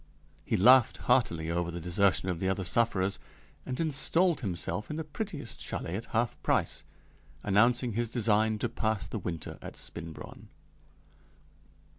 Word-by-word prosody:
He -, -, 0 dB
laughed 125 Hz, +4 st, +6 dB
heartily 80 Hz, 0 st, +2 dB
over 85 Hz, 0 st, -1 dB
the 85 Hz, 0 st, -5 dB
desertion 90 Hz, +3 st, +2 dB
of 90 Hz, -3 st, -2 dB
the 95 Hz, -, 0 dB
other 95 Hz, 0 st, -1 dB
sufferers, 95 Hz, 0 st, +1 dB, 0.5 s
and 125 Hz, -, -4 dB
installed 165 Hz, +2 st, +2 dB
himself 95 Hz, +1 st, -3 dB
in 150 Hz, -, -4 dB
the 160 Hz, -, -3 dB
prettiest 150 Hz, -, -6 dB
châlet 85 Hz, -, -4 dB
at 110 Hz, -, -4 dB
half 115 Hz, 0 st, -1 dB
price, -, -, 0 dB, 0.6 s
announcing 120 Hz, +4 st, +3 dB
his 115 Hz, +1 st, -1 dB
design 110 Hz, -2 st, +2 dB
to 120 Hz, -, -1 dB
pass 110 Hz, -4 st, -1 dB
the 100 Hz, +4 st, -5 dB
winter 85 Hz, -3 st, -6 dB
at -, -, -8 dB
Spinbronn. 80 Hz, -2 st, -8 dB
105 Hz, 145 wpm, -30 LUFS, 90-120 Hz, 0.6 s, laughed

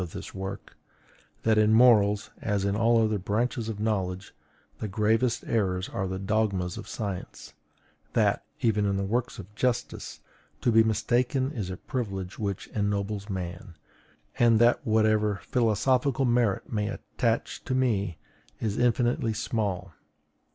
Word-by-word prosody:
of 85 Hz, -2 st, -6 dB
this -, -, -7 dB
work, 95 Hz, +1 st, -6 dB, 0.7 s
that 110 Hz, -1 st, +3 dB
in 110 Hz, 0 st, +4 dB
morals, 110 Hz, -3 st, +5 dB
as 100 Hz, -2 st, 0 dB
in 100 Hz, 0 st, +1 dB
all 115 Hz, +1 st, +4 dB
other 110 Hz, -2 st, +1 dB
branches 115 Hz, +4 st, -1 dB
of 105 Hz, -2 st, -5 dB
knowledge, 100 Hz, -3 st, -2 dB, 0.5 s
the 110 Hz, -, -3 dB
gravest 110 Hz, +4 st, +1 dB
errors 95 Hz, -4 st, 0 dB
are 95 Hz, -1 st, -2 dB
the 95 Hz, 0 st, -3 dB
dogmas 95 Hz, -3 st, 0 dB
of -, -, -8 dB
science; 100 Hz, -5 st, -6 dB, 0.6 s
that, -, -, +2 dB, 0.2 s
even 105 Hz, -3 st, +2 dB
in 100 Hz, 0 st, 0 dB
works 120 Hz, +4 st, -1 dB
of 100 Hz, +1 st, -10 dB
justice, 120 Hz, +2 st, -2 dB, 0.4 s
to 120 Hz, -, +2 dB
be 115 Hz, 0 st, +6 dB
mistaken 120 Hz, +5 st, +1 dB
is 105 Hz, -10 st, -4 dB
a 95 Hz, -, -5 dB
privilege 95 Hz, -7 st, -4 dB
which 100 Hz, -3 st, -3 dB
ennobles 100 Hz, 0 st, -2 dB
man; 90 Hz, -2 st, -5 dB, 0.6 s
and 115 Hz, -2 st, +5 dB
that 120 Hz, +2 st, +4 dB
whatever 110 Hz, -2 st, +2 dB
philosophical 125 Hz, +3 st, +1 dB
merit 120 Hz, -3 st, +1 dB
may 105 Hz, -1 st, 0 dB
attach -, -, -2 dB
to 130 Hz, -, -2 dB
me 100 Hz, -9 st, 0 dB, 0.4 s
is 110 Hz, -2 st, -2 dB
infinitely 120 Hz, -1 st, +2 dB
small. 100 Hz, -5 st, -2 dB
105 Hz, 140 wpm, -27 LUFS, 100-115 Hz, 0.7 s, be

